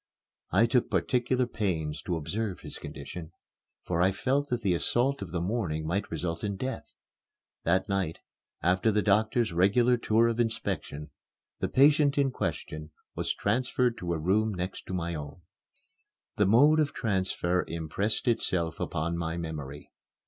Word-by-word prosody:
I 100 +6 +4
took 120 +1 +2
particular 125 0 +1
pains 85 -10 -2
to 90 - 0
observe 95 +6 -3
his - - -8
condition, 80 +4 -8 0.5
for 85 -1 0
I 95 +2 +4
felt 135 +8 0
that 120 -2 -1
the 95 -3 +3
assault 125 +10 +1
of 90 - -6
the 90 - -1
morning 85 -5 -1
might 90 +6 -1
result 85 +1 -3
in 100 -1 -1
death. 130 +6 -5 0.7
That 95 +4 +2
night, 95 -5 -1 0.5
after 90 +5 +3
the 105 0 +1
doctor's 110 +1 +2
regular 115 +8 +4
tour 115 0 +3
of 115 0 -1
inspection, 95 -9 -2 0.5
the - - -1
patient 145 +1 +5
in 140 -2 +3
question 75 -9 -4 0.2
was - - -1
transferred 125 -1 +1
to 85 -1 -2
a - - 0
room 105 +6 +1
next 90 +1 -5
my 85 -2 -2
own. 75 +2 -7 0.9
The 105 - +3
mode 145 +9 +6
of 150 -2 +1
transfer 95 -4 0
impressed 85 - -2
itself 90 -9 0
upon 85 +2 -2
my 80 0 -2
memory. 75 -4 -6
95 Hz, 150 wpm, -29 LUFS, 85-120 Hz, 0.9 s, mode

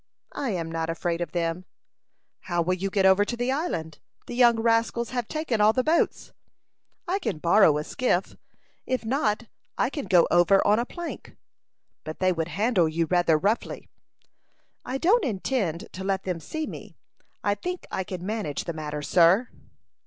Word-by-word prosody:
"I 275 - -3
am 170 -5 -3
not 165 0 -2
afraid 170 +1 -2
of 170 -3 -3
them." 170 +1 -2 0.7
"How 175 -2 -1
will 180 +2 +1
you 190 +2 -2
get 195 0 +1
over 190 +1 +6
to 240 +3 -4
the 245 +2 0
island? 165 - -3 0.3
The - - -7
young 240 -2 +4
rascals 230 +1 +1
have 245 -3 -2
taken 305 -9 -1
all 215 +1 +5
the 255 - +1
boats." 320 +4 0 0.7
"I 375 +3 0
can 360 - -3
borrow 170 -1 +4
a 150 - -2
skiff; 220 - -1 0.5
if 255 -3 -1
not, 230 -3 0 0.3
I - - +1
can 285 -3 -4
go 175 -3 +5
over 175 +3 +4
on 210 +2 +4
a 240 - -2
plank." 345 -1 -8 0.7
"But 155 0 -7
they 185 0 +2
would 165 -2 -2
handle 185 0 +1
you 165 +1 0
rather 175 -2 +3
roughly." 205 +8 -2 0.9
"I 260 - -3
don't 390 - +3
intend 200 - -2
to 190 - -7
let 195 -1 -1
them 180 -3 -3
see 310 - -4
me. - - -9 0.5
I 205 - +2
think 360 - -5
I 190 - -2
can 180 -1 -7
manage 210 -8 -3
the 170 - -4
matter, 150 -1 -5
sir." 175 - +4
195 Hz, 175 wpm, -26 LUFS, 170-240 Hz, 0.9 s, over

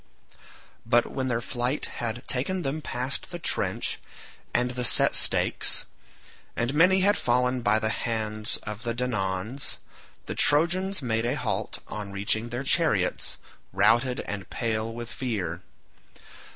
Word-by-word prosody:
But 120 +1 +3
when 130 -1 -2
their 120 -2 0
flight 125 +3 -1
had 120 +1 -5
taken 175 +9 0
them 145 +3 -2
past 130 0 -3
the 175 - -5
trench 170 - -1 0.5
and 125 +1 +1
the 125 0 -3
set 120 - +7
stakes, - - +2 0.7
and 120 +3 -1
many 180 +5 +5
had 205 +2 +4
fallen 125 -1 +1
by 110 -1 +3
the 110 0 0
hands 110 -1 -1
of 105 0 -6
the 115 0 -2
Danaans, 110 0 -2 0.5
the - - -4
Trojans 175 +4 +2
made 115 -1 0
a 125 - 0
halt - - -3
on 105 -1 -6
reaching 100 +4 -1
their 120 +3 -4
chariots, 140 - +1 0.3
routed 115 +6 +3
and 100 -2 -6
pale 110 -1 -2
with 120 0 -7
fear. 100 -10 -3
120 Hz, 140 wpm, -26 LUFS, 110-130 Hz, 0.7 s, set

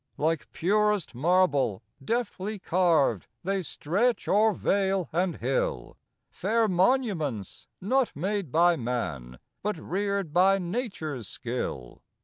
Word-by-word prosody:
Like 160 0 -1
purest 210 -1 +1
marble, 145 - +2 0.2
deftly 215 - -2
carv'd, 165 - +2 0.2
They 195 +1 0
stretch 195 +9 -1
o'er 215 +2 +4
vale 195 -2 0
and 175 +1 +1
hill, - - -2 0.4
Fair 225 0 +1
monuments, 180 - 0
not 255 +6 +1
made 190 0 -2
by 170 +2 +4
man, 80 - -4 0.2
But 210 -2 -2
rear'd 195 -1 -2
by 190 +3 +5
nature's 175 - -4
skill. 110 - -5
185 Hz, 110 wpm, -27 LUFS, 145-205 Hz, 0.4 s, by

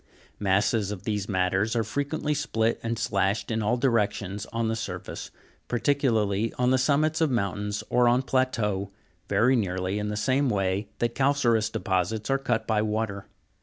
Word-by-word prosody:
Masses 100 +1 +2
of 105 -3 -6
these 105 -2 -2
matters 95 +3 +1
are 115 - +2
frequently 145 +6 -2
split 115 -6 0
and 115 0 -2
slashed 100 -1 0
in 110 0 0
all 110 +4 +1
directions 105 -5 0
on 115 -1 -2
the 110 - 0
surface, 110 - -6 0.4
particularly 115 -5 +1
on 125 0 +1
the 130 - +3
summits 155 +4 +2
of 160 - +3
mountains 105 -3 -1
or 125 0 +3
on 125 +2 +3
plateaux, 115 -7 0 0.4
very 115 +6 +4
nearly 95 -2 -1
in 105 - -2
the 105 0 -3
same 130 +5 +2
way 100 -1 0
that 120 0 0
calcareous 120 -6 +2
deposits 105 +3 -1
are 135 - +2
cut 120 -4 -1
by 110 -2 +1
water. 105 -2 -2
110 Hz, 165 wpm, -26 LUFS, 100-125 Hz, 0.4 s, very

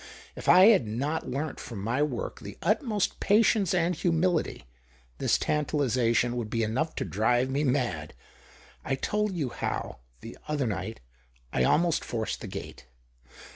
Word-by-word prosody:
If - - -4
I 185 +4 +9
had 195 - +4
not 140 +9 -2
learnt 140 +4 -3
from 115 - -8
my 120 +6 0
work 485 - -2
the - - -9
utmost 220 - 0
patience 210 -2 +3
and 175 -1 +2
humility, 170 - 0 0.5
this - - +2
tantalization 125 -5 +1
would 115 -3 -3
be 115 +1 0
enough 130 +9 -1
to - - -2
drive 120 +5 +1
me 140 +3 0
mad. 130 -3 -1 0.7
I 135 - -1
told 210 +7 -1
you 145 -7 -1
how - - -4
— - - -34
the 115 - -10
other 150 -3 0
night— 110 +1 -4 0.5
I 65 - +2
almost 170 - +2
forced 110 -2 -3
the - - -6
gate. 65 - -8
145 Hz, 155 wpm, -28 LUFS, 115-175 Hz, 0.7 s, I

